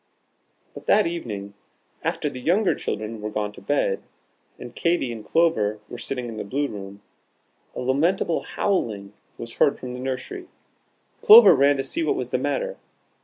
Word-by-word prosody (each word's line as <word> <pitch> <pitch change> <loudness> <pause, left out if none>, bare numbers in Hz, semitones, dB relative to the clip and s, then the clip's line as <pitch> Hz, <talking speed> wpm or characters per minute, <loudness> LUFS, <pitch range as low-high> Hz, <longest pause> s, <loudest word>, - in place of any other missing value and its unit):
But - - -12
that 210 0 +4
evening, 105 -13 -5 0.5
after - - -2
the 130 -3 -6
younger 185 - +2
children 110 0 -5
were 105 - -3
gone 105 -1 -3
to 105 - -14
bed, 100 -4 0 0.6
and 120 - -10
Katy 170 -7 0
and 110 -2 -7
Clover 110 -12 +1
were 120 - -8
sitting 125 +1 -4
in 115 -2 -7
the - - -3
Blue 140 +8 -1
room, 100 -3 -9 0.7
a - - -4
lamentable 160 +7 +1
howling 105 - -2 0.2
was 115 0 -9
heard 140 - +3
from 125 -1 -7
the 125 - -7
nursery. 130 - -5 0.7
Clover 435 - +9
ran 140 +1 +4
to 135 - -1
see 335 - -3
what - - +1
was - - -4
the - - 0
matter. - - -2
125 Hz, 170 wpm, -24 LUFS, 105-170 Hz, 0.7 s, Clover